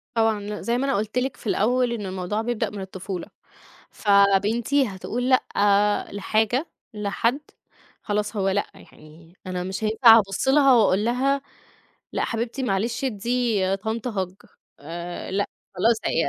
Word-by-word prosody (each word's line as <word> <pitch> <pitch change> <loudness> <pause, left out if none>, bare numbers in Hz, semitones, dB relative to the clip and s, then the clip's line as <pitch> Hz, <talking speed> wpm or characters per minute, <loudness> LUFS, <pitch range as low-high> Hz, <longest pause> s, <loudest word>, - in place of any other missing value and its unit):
طبعًا، 225 -2 +2
ل 205 +1 -6
زي 235 +1 0
ما 265 - 0
أنا 275 - +1
قُلت 210 +3 -2
لِك 255 +1 -1
في - - -10
الأول 245 +4 +2
إن 215 -3 -4
الموضوع 190 +3 -3
بيبدأ 230 -1 -1
من 205 -1 -7
الطفولة، 190 -1 -6 0.6
فبنتي 210 +7 +3
هتقول 225 +6 -3
لأ، 205 -5 +2
لحاجة، 220 - 0 0.3
لحد، 215 +5 -1 0.6
خلاص 210 +1 -2
هو 195 -2 +1
لأ، 200 +1 0
يعني، 165 +4 -17
أنا 180 -1 -3
مش 190 +3 -5
هينفع 225 +1 +7
أبُص 195 +3 -1
لها 275 -1 +6
وأقول 210 -3 +3
لها 270 +4 +1 0.7
لأ - - 0
حبيبتي 235 +3 -3
معلش 230 +3 -1
ادّي 225 -4 0
طنط 220 +4 -3
hug 190 -3 -5 0.3
آآ، 170 +4 -6
لأ، 200 +2 0 0.3
خلاص 225 +6 +3
هي 165 - +1
210 Hz, 145 wpm, -24 LUFS, 195-240 Hz, 0.7 s, هينفع